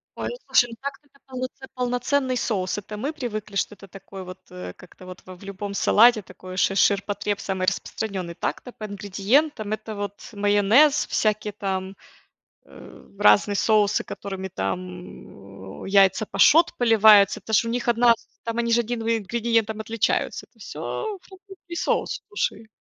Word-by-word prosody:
Ой, - - -4
ну, - - -5
слушай, 240 - +4
ну, - - -8
так-то 280 +1 -7
это 275 - -27
полноцен 255 +1 -6
полноценный 250 +1 0
соус. 190 -5 -1
Это 210 +1 -7
мы 280 +8 -3
привыкли, 215 -7 -5
что 210 - -1
это 200 0 -14
такой 195 0 -10
вот, 185 0 -10
э, 180 0 -8
как-то 180 0 -16
вот 185 0 -10
в 185 0 -10
в 180 - -17
любом 200 +1 -6
салате 220 +2 +5
такое 185 0 -11
шир 195 +1 +2
ширпотреб 205 +1 +1
самый 190 -1 -3
распространенный. 190 -2 -3
Так-то 250 - -4
по 215 - -8
ингредиентам 210 +5 0
это 215 0 -6
вот 205 0 -6
майонез, 205 +9 +4
всякие 215 -1 0
там, 190 -1 -4 0.7
э, - - -15
разные 105 - +5
соусы, 210 -1 +2
которыми 195 -1 -6
там, 100 - -7
э, - - -6
яйца 195 +2 +4
пашот 320 +9 +5
поливаются, 215 -3 +6
это 220 +2 -8
ж 220 - +4
у - - -3
них 240 +1 -2
1 235 0 +5
с - - -24 0.2
там 230 0 -4
они 235 0 0
же 235 +1 +4
1 235 0 -4
в - - -4
ингредиентом 225 0 -1
отличаются, 225 0 -1
это - - -30
всё - - -5 0.2
французский 380 -2 -13
соус, - - -1
слушай. 230 - -3
210 Hz, 165 wpm, -24 LUFS, 195-235 Hz, 0.7 s, поливаются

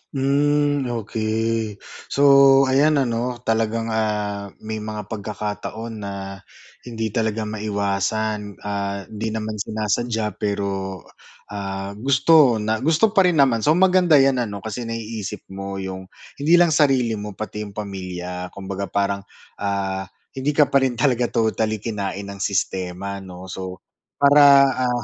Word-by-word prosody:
Hmm, 145 0 +2
okey. 110 -1 -2 0.3
So, 140 -1 +6
ayan 150 +3 +4
ano, 120 -2 -1
talagang, 115 0 0
ah, 105 -2 -1 0.2
may 110 0 -4
mga 105 0 -5
pagkakataon 105 +1 -5
na 100 -1 -6 0.5
hindi 110 -2 -3
talaga 110 -1 -1
maiwasan, 105 0 -2
ah, 100 -1 -3
hindi 110 +2 -5
naman 110 -1 -4
sinasadya 110 +1 -1
pero, 95 -2 -3 0.5
ah, 100 -1 -4
gusto 140 0 +5
na 110 +1 -1
gusto 165 +8 +3
pa 195 -4 +4
rin 175 - +2
naman. 130 -5 +4
So, 150 +8 +3
maganda 180 -3 +4
'yan 135 -2 +4
ano, 100 -4 -4
kasi 115 +2 -5
naiisip 115 -3 -5
mo 100 0 -6
yung 95 -1 -6 0.3
hindi 160 +5 +4
lang 175 -2 +5
sarili 135 -6 +3
mo, 105 -1 -7
pati 105 0 -6
yung 100 - -13
pamilya 90 -3 -5
kumbaga 100 0 -5
parang, 100 0 -1 0.3
ah, 95 -1 -2 0.2
hindi 140 +2 -2
ka 150 -2 +4
pa 140 - +5
rin 120 - -4
talaga 125 -1 +2
totally 110 -2 0
kinain 100 -3 -3
ng 100 - -10
sistema 95 0 -2
'no, 95 -1 -10
so 95 0 -7 0.3
para, 145 +1 +6 0.4
ah, 120 0 -1
110 Hz, 135 wpm, -22 LUFS, 100-125 Hz, 0.5 s, So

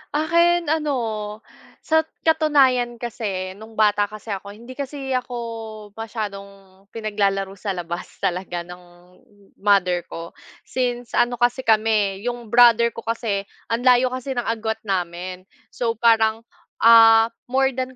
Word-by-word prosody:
Akin 340 +1 +2
ano, 305 -3 0 0.9
sa 320 0 +3 0.2
katunayan 275 -7 +3
kase, 210 -6 -4
nung 220 +1 -12
bata 210 -1 +3
kase 215 +1 -9
ako, 200 +1 -6
hindi 235 +4 -12
kasi 275 0 -6
ako, 230 -4 -5
masyadong 200 -3 -7
pinaglalaro 200 -3 -1
sa 195 0 -3
labas 175 -1 -5 0.2
talaga 180 -2 -2
ng 180 +1 -11 0.8
mother 185 -3 +2
ko, 165 0 -8 0.3
since 245 -2 -3
ano 240 0 +2
kasi, 240 +2 +1
kami 215 -4 +1
'yong 240 -1 -4
brother 235 0 +6
ko 230 - -7
kasi, 225 -3 -2 0.2
ang 230 +1 -2
layo 255 0 +5
kasi 255 +1 -5
ng 245 -2 -3
agwat 220 -1 -2
namin, 180 -1 -3 0.3
so, 235 -2 0
parang, 225 -1 +3 0.4
ah, 225 0 +7 0.2
more 265 0 +2
than 255 0 -4
225 Hz, 130 wpm, -22 LUFS, 200-245 Hz, 0.9 s, ah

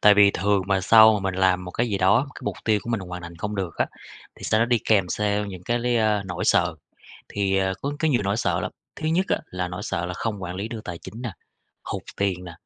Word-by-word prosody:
Tại 105 -1 +7
vì 100 0 +7
thường 100 +1 +1
mà 95 -1 +2
sau 110 +1 +7
mình 95 -1 -2
làm 90 -1 +2
một 90 - -6
cái 120 - 0
gì 100 -3 -1
đó, 100 +9 +4
cái - - -10
mục - - -2
tiêu 110 -2 +3
của 120 - -5
mình 115 - 0
hoàn 90 -1 -7
thành 85 0 -9
không 100 +5 -4
được 95 -5 -3
á, - - +1 0.5
thì - - -15
sau 110 - +2
đó 115 - +3
đi 120 -1 +3
kèm 100 -5 +3
theo 105 +1 0
những 95 -3 -8
cái, 120 +3 0
ơ, 110 -2 +2
nỗi 90 -2 -4
sợ. - - +3 0.5
Thì, 100 -1 0
ờ, 95 0 +1
có 140 +1 -1
có 160 - +2
nhiều 125 -7 +2
nỗi 100 +1 0
sợ 115 - 0
lắm, - - -3 0.3
thứ 155 - -2
nhất 180 +4 +2
á, - - +2
là 90 -1 -3
nỗi 90 +1 -6
sợ 85 +1 -2
là 90 - -4
không 105 0 -3
quản 90 -1 -4
lý 100 +3 -3
được 115 -1 -6
tài 85 -2 -6
chính 115 +3 -9
nè, 120 -4 -4 0.5
hụt - - -4
tiền 95 -3 -1
nè, 85 - -8
100 Hz, 270 wpm, -24 LUFS, 90-110 Hz, 0.5 s, Tại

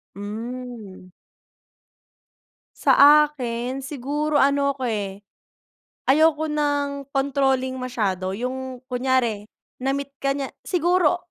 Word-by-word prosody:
Hmm. 220 -2 -7 1.7
Sa - - +4 0.3
akin 245 -2 -4
siguro 290 +2 -1
ano 280 0 +3
ko, 260 -3 -3
eh. 200 -2 -4 0.8
Ayoko 315 +2 +4
ng 285 -2 -1
controlling 270 -1 +1
masyado 210 -8 -2
yung 260 +1 -4
kunyari 250 -5 0 0.3
na-meet 275 +1 -2
ka 275 0 0
niya 275 -1 -4
siguro 355 -1 +2
260 Hz, 90 wpm, -23 LUFS, 240-280 Hz, 1.7 s, Sa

